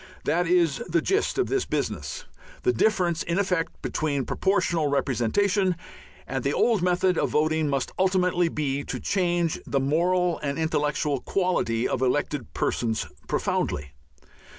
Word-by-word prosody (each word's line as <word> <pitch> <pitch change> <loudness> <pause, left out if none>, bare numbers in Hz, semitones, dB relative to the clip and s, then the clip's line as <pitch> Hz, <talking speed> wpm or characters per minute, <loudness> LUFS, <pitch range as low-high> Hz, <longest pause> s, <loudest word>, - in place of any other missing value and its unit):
That 175 +2 +1
is 170 -5 +2
the 170 0 +3
gist 390 - 0
of 385 - +2
this 400 -1 0
business. - - -3 0.4
The 370 - +3
difference 180 -6 +1
in 170 +2 -1
effect 180 -4 -1
between 145 -4 -1
Proportional 175 -5 +1
Representation 180 - +1 0.5
and - - -3
the - - 0
old 240 - +2
method 180 0 +2
of - - +1
voting 155 0 +1
must 135 -2 -1
ultimately 180 -2 +2
be 145 -3 -2
to - - -4
change 175 -4 0
the 140 - +1
moral 175 +5 +1
and 140 -2 -3
intellectual 150 -2 0
quality 125 -13 0
of 130 - -2
elected 130 0 0
persons 115 -2 0 0.2
profoundly. 70 0 -1
165 Hz, 140 wpm, -26 LUFS, 145-185 Hz, 0.5 s, the